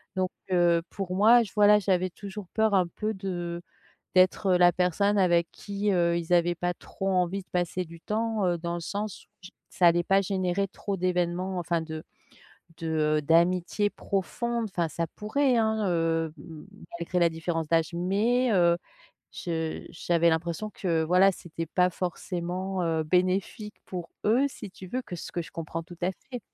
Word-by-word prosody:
donc, 185 Hz, -1 st, 0 dB, 0.2 s
heu, 175 Hz, -2 st, +4 dB
pour 190 Hz, -2 st, -4 dB
moi 225 Hz, +5 st, +6 dB
je 205 Hz, -, -9 dB
voilà 210 Hz, 0 st, +7 dB
j'avais 185 Hz, -2 st, +1 dB
toujours 200 Hz, +1 st, -8 dB
peur, 220 Hz, -1 st, +2 dB
un 185 Hz, -3 st, +3 dB
peu, 215 Hz, +5 st, -3 dB
de 175 Hz, -3 st, -4 dB, 0.5 s
d'être, 185 Hz, +2 st, +4 dB
heu, -, -, +3 dB
la 175 Hz, 0 st, +6 dB
personne 185 Hz, +4 st, +1 dB
avec 175 Hz, -3 st, +3 dB
qui, 200 Hz, 0 st, -2 dB
heu, 170 Hz, -2 st, +2 dB
ils 170 Hz, 0 st, -4 dB
avaient 175 Hz, 0 st, +4 dB
pas 175 Hz, +1 st, -1 dB
trop 195 Hz, +2 st, -5 dB
envie 185 Hz, +1 st, 0 dB
de -, -, -32 dB
passer 180 Hz, +1 st, -1 dB
du 165 Hz, 0 st, -13 dB
temps, 220 Hz, 0 st, -1 dB
heu, 175 Hz, -1 st, +1 dB
dans 170 Hz, +1 st, -3 dB
le 175 Hz, -, -3 dB
sens 205 Hz, +3 st, -5 dB, 0.2 s
j 185 Hz, -, -11 dB, 0.2 s
ça 180 Hz, -, +3 dB
allait 170 Hz, 0 st, +3 dB
pas 195 Hz, +3 st, +3 dB
générer 190 Hz, 0 st, 0 dB
trop 195 Hz, +1 st, -5 dB
d'événements, 180 Hz, +1 st, -1 dB
enfin 170 Hz, -1 st, -1 dB
de 160 Hz, -1 st, -6 dB, 0.8 s
de 165 Hz, -, -5 dB
heu, 155 Hz, -1 st, +1 dB
d'amitié 175 Hz, +6 st, +2 dB
profonde, 235 Hz, +4 st, -2 dB
enfin 175 Hz, -3 st, -1 dB
ça 170 Hz, +2 st, -2 dB
pourrait, 255 Hz, +5 st, +1 dB
hein, 220 Hz, -1 st, +1 dB
heu, 165 Hz, -2 st, 0 dB
m 160 Hz, -2 st, -11 dB, 0.3 s
malgré 170 Hz, +1 st, -1 dB
la 170 Hz, -1 st, +4 dB
différence 165 Hz, 0 st, -3 dB
d'âge, 165 Hz, 0 st, +2 dB
mais, 215 Hz, +8 st, +1 dB
heu, 170 Hz, -3 st, +4 dB, 0.6 s
je 160 Hz, -3 st, -3 dB
j'avais 170 Hz, 0 st, +1 dB
l'impression 170 Hz, +5 st, -2 dB
que 165 Hz, -4 st, 0 dB
voilà, 180 Hz, +4 st, +5 dB
c'était 165 Hz, -2 st, -6 dB
pas 180 Hz, +3 st, +2 dB
forcément, 180 Hz, +1 st, -3 dB
heu, 165 Hz, -1 st, 0 dB
bénéfique 185 Hz, +5 st, 0 dB
pour 175 Hz, -3 st, -6 dB
eux, 235 Hz, +6 st, +4 dB
si 210 Hz, -7 st, -9 dB
tu 185 Hz, -, -11 dB
veux, 250 Hz, +8 st, -3 dB
que 180 Hz, -, -7 dB
ce -, -, -8 dB
que 175 Hz, -, -2 dB
je 165 Hz, -, -12 dB
comprends 165 Hz, 0 st, -5 dB
tout 175 Hz, +1 st, -13 dB
à 180 Hz, -, +2 dB, 0.2 s
fait. 250 Hz, -2 st, -5 dB
180 Hz, 180 wpm, -27 LUFS, 170-200 Hz, 0.8 s, voilà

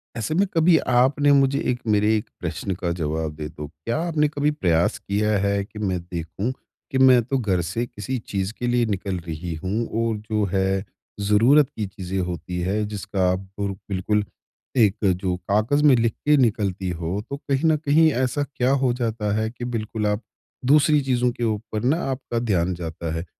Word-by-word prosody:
ऐसे 115 Hz, +6 st, -2 dB
में 195 Hz, +4 st, +4 dB
कभी 165 Hz, 0 st, +5 dB, 0.2 s
आपने 145 Hz, +3 st, +4 dB
मुझे 140 Hz, 0 st, +4 dB
एक 125 Hz, -, -3 dB
मेरे 105 Hz, +1 st, +3 dB
एक 105 Hz, -, -6 dB
प्रश्न 95 Hz, -, -3 dB
का 90 Hz, -1 st, -2 dB
जवाब 80 Hz, 0 st, -2 dB
दे 75 Hz, 0 st, -5 dB
दो। 75 Hz, -1 st, -8 dB
क्या 80 Hz, -, -4 dB
आपने 150 Hz, -3 st, +2 dB
कभी 145 Hz, 0 st, 0 dB
प्रयास 85 Hz, -, +1 dB
किया 105 Hz, +1 st, 0 dB
है 100 Hz, 0 st, +1 dB
कि 105 Hz, -, -11 dB
मैं 95 Hz, -4 st, -1 dB
देखूँ, 85 Hz, +6 st, -4 dB, 0.4 s
कि 135 Hz, -, 0 dB
मैं 130 Hz, -2 st, +7 dB
तो 135 Hz, +4 st, -1 dB
घर 95 Hz, -7 st, 0 dB
से 90 Hz, +8 st, -2 dB
किसी 120 Hz, +3 st, -5 dB
चीज़ 100 Hz, +1 st, -2 dB
के 120 Hz, -, -1 dB
लिए 120 Hz, 0 st, +2 dB
निकल 95 Hz, -3 st, -2 dB
रही 80 Hz, +1 st, -4 dB
हूँ 105 Hz, +5 st, -1 dB, 0.2 s
और 110 Hz, -2 st, -1 dB
जो 105 Hz, -1 st, +2 dB
है 95 Hz, 0 st, +1 dB, 0.4 s
ज़रूरत 115 Hz, +8 st, +4 dB
की 110 Hz, -, -2 dB
चीज़ें 95 Hz, 0 st, -5 dB
होती 90 Hz, 0 st, -4 dB
है 100 Hz, +4 st, 0 dB
जिसका 100 Hz, -2 st, -1 dB
आपको 95 Hz, +2 st, -4 dB, 0.2 s
बिल्कुल 100 Hz, +2 st, 0 dB, 0.5 s
एक 105 Hz, -4 st, +4 dB, 0.3 s
जो 90 Hz, -2 st, 0 dB
कागज 110 Hz, +8 st, +2 dB
में 145 Hz, -3 st, +7 dB
लिख 115 Hz, -1 st, +1 dB
के 150 Hz, 0 st, +5 dB
निकलती 100 Hz, -6 st, +1 dB
हो, 85 Hz, +4 st, -3 dB
तो 140 Hz, -, -4 dB
कहीं 140 Hz, +2 st, 0 dB
न 155 Hz, -, +4 dB
कहीं, 155 Hz, +1 st, +4 dB
ऐसा 130 Hz, +3 st, 0 dB
क्या 130 Hz, +1 st, +2 dB
हो 135 Hz, -3 st, +2 dB
जाता 110 Hz, -4 st, -2 dB
है 110 Hz, +1 st, 0 dB
कि 120 Hz, 0 st, -7 dB
बिल्कुल 110 Hz, -2 st, -2 dB
आप, 105 Hz, +2 st, 0 dB, 0.4 s
दूसरी 150 Hz, +2 st, +5 dB
चीज़ों 125 Hz, -2 st, +1 dB
के 120 Hz, -, -6 dB
ऊपर 110 Hz, 0 st, -2 dB
ना 140 Hz, +6 st, +3 dB
आपका 125 Hz, -3 st, -3 dB
ध्यान 95 Hz, -6 st, +1 dB
जाता 80 Hz, -1 st, -5 dB
है? 80 Hz, -, -4 dB
105 Hz, 190 wpm, -23 LUFS, 95-130 Hz, 0.5 s, मैं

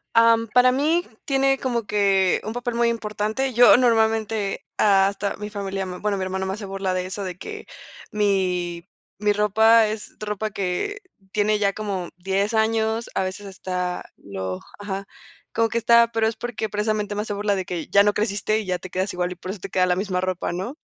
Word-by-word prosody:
Am, 230 Hz, 0 st, +5 dB
para 250 Hz, +3 st, +5 dB
mí 310 Hz, +7 st, +1 dB, 0.2 s
tiene 270 Hz, -1 st, +2 dB
como 240 Hz, -4 st, -1 dB
que 195 Hz, -3 st, +2 dB
un 215 Hz, -, -4 dB
papel 245 Hz, 0 st, -3 dB
muy 235 Hz, 0 st, +3 dB
importante, 220 Hz, +3 st, -2 dB
yo 240 Hz, +1 st, +8 dB
normalmente, 220 Hz, -3 st, +1 dB
hasta 200 Hz, 0 st, +3 dB
mi 210 Hz, 0 st, -6 dB
familia, 195 Hz, -2 st, -3 dB
mm, 180 Hz, -1 st, -7 dB
bueno 205 Hz, -1 st, 0 dB
mi 190 Hz, -, -2 dB
hermano 190 Hz, 0 st, -2 dB
me 190 Hz, -, -2 dB
hace 210 Hz, +1 st, -6 dB
burla 195 Hz, -1 st, -2 dB
de 180 Hz, 0 st, -1 dB
eso, 190 Hz, +2 st, -5 dB
de 180 Hz, -2 st, -5 dB
que 430 Hz, -, -8 dB, 0.5 s
mi 185 Hz, -4 st, 0 dB, 0.3 s
mi 210 Hz, 0 st, +2 dB
ropa 220 Hz, +2 st, +5 dB
es 215 Hz, 0 st, -6 dB
ropa 210 Hz, 0 st, -3 dB
que 200 Hz, -, -2 dB, 0.3 s
tiene 210 Hz, 0 st, +2 dB
ya 200 Hz, -1 st, +2 dB
como 195 Hz, -4 st, -4 dB
10 195 Hz, +4 st, -1 dB
años, 220 Hz, +1 st, +1 dB
a -, -, +1 dB
veces 190 Hz, +2 st, -5 dB
está 180 Hz, -2 st, -4 dB
lo, 95 Hz, -2 st, -5 dB, 0.2 s
ajá, 200 Hz, -1 st, -4 dB, 0.5 s
como 225 Hz, 0 st, +2 dB
que 235 Hz, -, -1 dB
está 235 Hz, 0 st, +5 dB
pero 225 Hz, -1 st, +1 dB
es 225 Hz, -, -2 dB
porque 235 Hz, -2 st, -4 dB
precisamente 210 Hz, 0 st, -1 dB
me 210 Hz, -, -1 dB
hace 210 Hz, -, -4 dB
burla 205 Hz, 0 st, 0 dB
de 190 Hz, -1 st, -3 dB
que 175 Hz, -3 st, -4 dB
ya 200 Hz, -, +5 dB
no 205 Hz, 0 st, +3 dB
creciste 210 Hz, 0 st, 0 dB
y 215 Hz, -, -5 dB
ya 180 Hz, -1 st, 0 dB
te 185 Hz, -, -9 dB
quedas 190 Hz, +2 st, -1 dB
igual, 180 Hz, 0 st, -1 dB
y -, -, -5 dB
por 185 Hz, +1 st, -6 dB
eso 200 Hz, -, -7 dB
te 195 Hz, -, -7 dB
queda 185 Hz, 0 st, +2 dB
la 180 Hz, -, +2 dB
misma 185 Hz, -1 st, -1 dB
ropa, 185 Hz, -1 st, -2 dB
¿no? 190 Hz, +10 st, -4 dB
205 Hz, 205 wpm, -23 LUFS, 190-225 Hz, 0.5 s, yo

